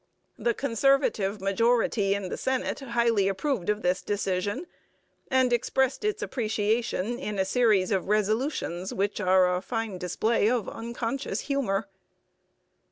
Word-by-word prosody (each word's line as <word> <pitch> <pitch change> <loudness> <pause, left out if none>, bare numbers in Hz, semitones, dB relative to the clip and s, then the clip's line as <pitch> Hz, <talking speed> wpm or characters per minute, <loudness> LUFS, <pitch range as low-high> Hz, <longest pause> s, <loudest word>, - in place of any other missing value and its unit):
The 235 -1 +1
Conservative 235 -6 +1
majority 205 0 +2
in 200 -2 -4
the - - -3
Senate 260 -1 -1
highly 235 -6 +1
approved 195 - -1
of 210 0 0
this 180 +1 +1
decision, 205 - -2 0.6
and 260 -2 +3
expressed 265 - +1
its 425 0 -1
appreciation 225 - -1
in 210 -6 -4
a 190 - +2
series 210 -3 +2
of 190 -2 0
resolutions 210 - 0
which 205 +1 -1
are 185 -1 +4
a 180 - -2
fine 225 -3 -3
display 215 +5 +1
of 235 -5 0
unconscious 235 +3 -3
humour. 225 -8 -1
220 Hz, 130 wpm, -27 LUFS, 195-245 Hz, 0.6 s, are